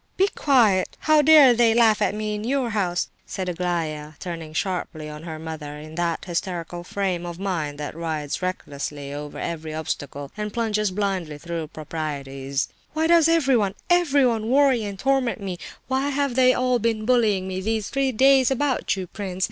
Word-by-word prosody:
"Be 390 +2 +4
quiet! 230 - +2
How 310 -1 +5
dare 295 -4 +8
they 230 -1 +4
laugh 225 -3 +4
at - - +1
me 215 0 -2
in 210 0 -4
your 255 0 0
house?" 185 -4 0 0.2
said 185 -1 -4
Aglaya, 165 -4 -2
turning 165 -3 -6
sharply 160 -2 -3
on 150 0 -8
her 160 -1 -6
mother 155 -2 -7
in 155 +1 -10
that 170 0 -2
hysterical 175 -1 -4
frame 185 -2 -2
of 175 -1 -6
mind 170 -7 -2
that 150 0 -5
rides 160 -2 -3
recklessly 145 -5 -4
over 145 0 -7
every 160 -2 -4
obstacle 145 -2 -5
and 210 0 -4
plunges 215 -2 0
blindly 185 -6 -2
through 165 0 -5
proprieties. 140 -3 -4 0.3
"Why 315 +1 +1
does 330 -1 +5
everyone, 265 -12 +2 0.2
everyone 270 -10 +3
worry 265 -3 +4
and 200 -1 -5
torment 270 0 +1
me? 190 -3 -5 0.3
Why 265 +2 0
have 280 -2 0
they 255 0 +5
all 255 -1 +1
been 225 -1 0
bullying 215 -6 +2
me 185 0 -3
these 220 +1 -1
three 275 -1 +1
days 265 +2 +5
about 270 -4 0
you, 190 -1 -4
prince? 185 0 -6
195 Hz, 170 wpm, -24 LUFS, 160-245 Hz, 0.3 s, dare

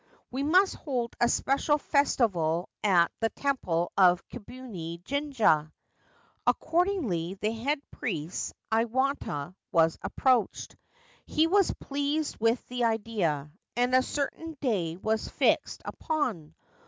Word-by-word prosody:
We 260 +2 -2
must 365 +7 +4
hold 245 -6 -3
a 240 - +5
special 280 +4 +2
festival 190 - +1
at 175 -5 +4
the 225 - +1
temple 180 -14 -1
of 180 -2 +4
Kibune 205 -9 -8
Jinja.' 240 - +1 0.8
Accordingly, 315 - +1
the 210 +2 -1
head 270 +7 -1
priest, 170 -7 -4 0.2
Iwata, 225 - 0 0.2
was 165 -1 +3
approached. 250 -6 +1 0.5
He 315 - +3
was 390 +3 +3
pleased 285 +2 -2
with 230 +2 +1
the 250 0 -2
idea, 205 -10 -1 0.2
and 245 +1 +1
a 255 - +6
certain 295 +4 -4
day 180 - -1
was 220 +3 -1
fixed - - +1
upon. 225 - -2
230 Hz, 115 wpm, -28 LUFS, 175-280 Hz, 0.8 s, a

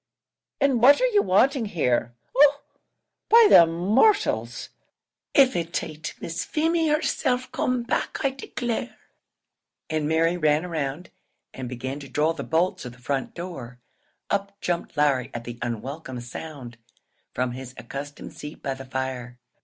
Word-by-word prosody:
and 270 -4 +2
what 275 +4 +7
are - - +3
ye 450 -5 +3
wanting 255 - +3
here? 125 - 0 0.2
Oh! 285 +1 +6 0.7
by 460 0 +8
the 170 - +9
mortials, 220 - +2 0.7
but 275 -2 +7
av - - -11
it 170 0 -1
aint 155 0 -7
Miss 165 0 -4
Feemy 325 +1 +1
herself 260 -4 0
come 250 -1 0
back 235 - -1
I 275 - +3
declare!" 245 -3 -4 0.9
And 155 -1 0
Mary 165 +2 +2
ran 155 0 +2
round, 160 0 -4 0.4
and 130 -2 -6
began 130 +3 -5
to 140 -2 -10
draw 150 +5 +1
the 160 - -6
bolts 170 +3 0
of 125 -2 -7
the - - -17
front 135 +2 -3
door. 165 -9 -7 0.5
Up 200 0 -2
jumped 175 -5 -3
Larry 140 -4 +2
at 120 - -4
the 120 0 -8
unwelcome 125 +3 -5
sound, 120 -1 -8 0.6
from 125 -1 0
his 130 0 -8
accustomed 145 +1 -7
seat 150 +1 -9
by 135 - -1
the 135 0 -9
fire. 130 -2 -4
160 Hz, 150 wpm, -25 LUFS, -, 0.9 s, the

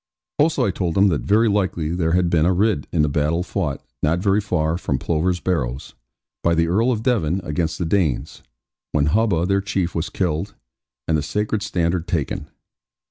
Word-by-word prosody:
Also 155 +2 +3
I 100 - +1
told 90 -3 -2
them 100 +1 +5
that 75 -7 0
very 110 - +3
likely 95 -6 0
there 85 -2 0
had 90 -1 +3
been 80 -1 +3
a 95 - +3
Ridd 100 -5 +1
in 80 -3 +2
the - - +2
battle 75 +4 0
fought, 85 -7 -3 0.2
not 80 +3 +2
very 100 +3 +2
far 85 -5 0
from 75 -6 -1
Plover's 85 +5 0
Barrows, 70 -9 -2 0.5
by 85 0 +2
the 85 0 +2
Earl 110 +9 +2
of 110 -3 -2
Devon 95 - +1
against 80 0 -2
the 85 - -2
Danes, 80 -6 0 0.5
when 75 -1 +2
Hubba 90 0 +2
their 100 +1 +1
chief 95 -3 -2
was 85 +4 -2
killed, 95 0 -2 0.5
and 80 - +2
the 75 - +1
sacred 105 +6 -1
standard 85 -4 -1
taken. 75 -6 -2
90 Hz, 190 wpm, -21 LUFS, 80-100 Hz, 0.5 s, them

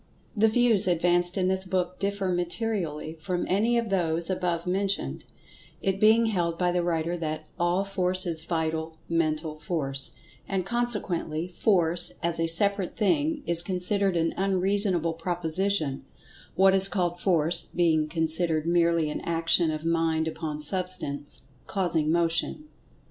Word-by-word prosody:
The 220 +1 +4
views 225 -3 +3
advanced 175 +1 +2
in 185 -1 +1
this 190 0 +1
book 185 -1 -2
differ 200 -1 -2
materially 175 -3 -2
from 180 +2 -3
any 225 +6 +1
of 230 -3 -2
those 170 -2 0
above 175 -2 -2
mentioned, 190 - -2 0.5
it 195 0 -1
being 220 +2 +5
held 175 -6 -1
by 180 0 +1
the 175 0 0
writer 170 0 -1
that 155 -1 -4
"All 175 +3 +1
Force 185 -1 -2
is 165 -2 0
Vital 160 -1 -3
Mental 155 -1 -1
Force," 140 -4 -2 0.3
and, 190 -2 -2
consequently, 195 -8 -2
"Force" 175 -3 +2
as 170 -1 0
a 165 - +1
separate 200 +2 +2
thing 295 +7 0
is 170 -1 +7
considered 185 +1 -1
an 165 0 0
unreasonable 190 -3 +2
proposition—what 175 +1 -2
is 195 0 +5
called 175 -3 -2
"Force" 170 -3 +1
being 160 -3 +2
considered 160 0 0
merely 170 -1 +2
an - - -5
action 165 0 +2
of 155 0 -4
Mind 165 -1 0
upon 155 -2 -5
Substance, 150 -4 -2 0.2
causing 170 -5 0
Motion. 170 - 0
175 Hz, 140 wpm, -26 LUFS, 165-195 Hz, 0.5 s, is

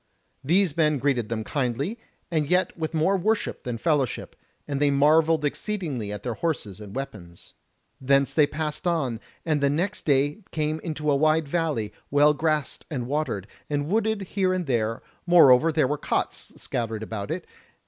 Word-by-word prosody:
These 170 +2 +2
men 155 -2 +3
greeted 125 -5 0
them 110 -1 -2
kindly, 140 - -2 0.3
and 155 -3 0
yet 180 +1 +2
with 160 -1 -3
more 160 +5 +3
worship 215 +4 -1
than 120 -2 -4
fellowship, 140 -2 -1 0.3
and 140 -2 -2
they 145 - +4
marvelled 155 +3 +4
exceedingly 145 - -3
at 105 - -6
their 120 - -2
horses 110 - -3
and 105 -1 -10
weapons. 95 -11 -7 0.5
Thence 140 +1 +3
they 150 -2 +4
passed 155 +4 -3
on, 135 -10 0 0.3
and 155 -3 +1
the 140 - +3
next 180 +8 -1
day 145 +2 +2
came 155 0 -1
into 155 -2 -2
a - - +3
wide 155 +1 +2
valley, 145 -10 -1 0.2
well 145 +1 +5
grassed 155 -1 -1
and 130 -7 -3
watered, 135 -8 -2 0.2
and 145 0 -1
wooded 220 +1 +1
here 190 0 0
and 185 -1 -1
there; 115 -4 -1 0.2
moreover 165 -3 +7
there 150 -4 +2
were 145 +2 -2
cots - - -2
scattered 115 -2 -3
about 105 -2 -5
it. - - -3
150 Hz, 170 wpm, -25 LUFS, 125-165 Hz, 0.5 s, moreover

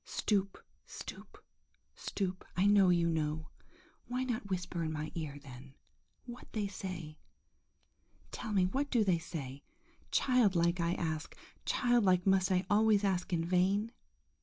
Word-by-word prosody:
Stoop, 200 -2 -1 0.3
stoop, - - -10 0.5
stoop! 185 -2 -3
I 185 - +3
know 200 -2 +6
you 170 -1 +3
know! 155 -1 -1 0.6
Why 250 +1 -1
not 240 -5 -3
whisper 180 -2 -2
in 155 - -2
my 155 0 -4
ear, 155 -4 -5
then, 135 0 -12 0.5
what 240 -1 -10
they 215 -2 -1
say? 180 -5 -6 1.1
Tell 220 - -5
me, 190 -3 +3
what 275 +9 -1
do 235 -4 +3
they 185 -4 +2
say? 145 -5 -6 0.5
Childlike, 190 -9 +3
I 170 +1 +1
ask, 160 -1 -3 0.3
childlike 205 -8 +3
must 190 -1 +3
I 185 0 +2
always 210 0 +4
ask 185 -3 0
in 165 -2 0
vain? 190 +5 +2
185 Hz, 135 wpm, -33 LUFS, 165-205 Hz, 1.1 s, know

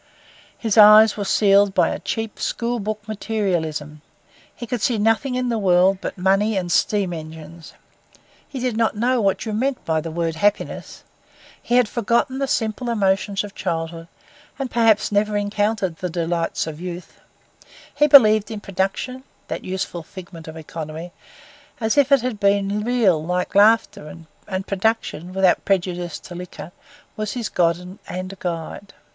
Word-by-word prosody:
His 220 -2 +1
eyes 215 +1 +8
were 205 - -3
sealed 200 0 +3
by - - +3
a - - -4
cheap, 225 -2 -4
school 235 0 -2
book 210 0 -5
materialism. 170 -9 -3 0.5
He 240 - -7
could 240 -1 -3
see 240 0 +1
nothing 225 +5 +1
in 250 -1 -1
the 230 -2 0
world 185 0 +3
but - - -5
money 195 +3 +2
and 175 -2 -2
steam 195 0 +1
engines. 160 0 -10 0.7
He 270 - -7
did 250 -2 -1
not 220 -2 0
know 245 +2 +1
what 195 +2 0
you 220 - -3
meant 260 +4 -1
by 160 -1 0
the 165 - -6
word 165 0 -2
happiness. 205 +4 -1 0.6
He 240 - -1
had 250 -2 +4
forgotten 235 +4 0
the 275 - 0
simple 230 0 -1
emotions 195 -2 0
of 205 -1 -9
childhood, 165 -2 -4 0.5
and 270 -3 -4
perhaps 225 -3 +3
never 210 +1 +1
encountered 205 -3 -1
the 180 - -4
delights 170 0 -2
of 160 0 -7
youth. 180 -1 -8 0.7
He 295 +1 +3
believed 215 -7 +7
in 220 -2 -5
production, 195 +7 -3 0.3
that - - -4
useful 185 -2 -4
figment 170 -1 -11
of 160 0 -8
economy, 160 +1 -7 0.7
as 220 -1 0
if 285 -1 +3
it 275 -4 +5
had 250 -5 -3
been 200 0 +1
real 215 -10 +2
like 180 +2 -2
laughter; 205 -7 +3 0.4
and 190 -1 -3
production, 195 -4 -1
without 190 -1 +2
prejudice 180 -3 -1
to 180 - -11
liquor, 175 -2 -9 0.4
was 215 -2 -3
his 235 -3 -3
god 180 +2 -1
and 185 +1 -6
guide. 175 +3 -5
200 Hz, 160 wpm, -21 LUFS, 175-220 Hz, 0.7 s, eyes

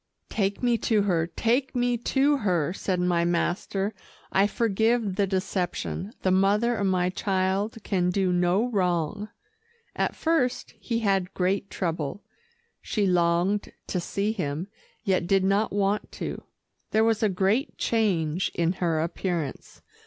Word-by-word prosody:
"Take 200 +2 -1
me 240 -2 +3
to 215 -3 +2
her, 170 -5 +1
take 245 +9 0
me 245 0 +2
to 275 +4 +2
her," 180 - 0
said 185 -2 -2
my 175 -1 +2
master. 180 +4 -1 0.4
"I 195 +1 +4
forgive 225 0 +1
the 200 0 +1
deception. 185 +1 -2
The 185 - +2
mother 205 +5 +3
of 200 -1 0
my 180 -1 +1
child 190 +3 0
can 180 -3 +1
do 185 0 +1
no 180 +6 +2
wrong." 185 +1 0 0.7
At - - -1
first 315 -7 0
he 230 -1 -2
had 195 -3 0
great 190 +2 0
trouble. 165 0 -3 0.6
She 210 -3 -1
longed 180 +2 +2
to 180 - -2
see 200 +4 -1
him, 175 -3 -3 0.3
yet 185 -5 +1
did 195 0 +3
not 200 +3 +2
want 205 +1 0
to. - - -5 0.4
There 220 +1 +3
was 225 -1 +2
a 215 - +3
great 200 +9 0
change 185 -7 +1
in 170 0 +2
her 170 -4 0
appearance. 170 -3 -4
195 Hz, 145 wpm, -26 LUFS, 180-215 Hz, 0.7 s, I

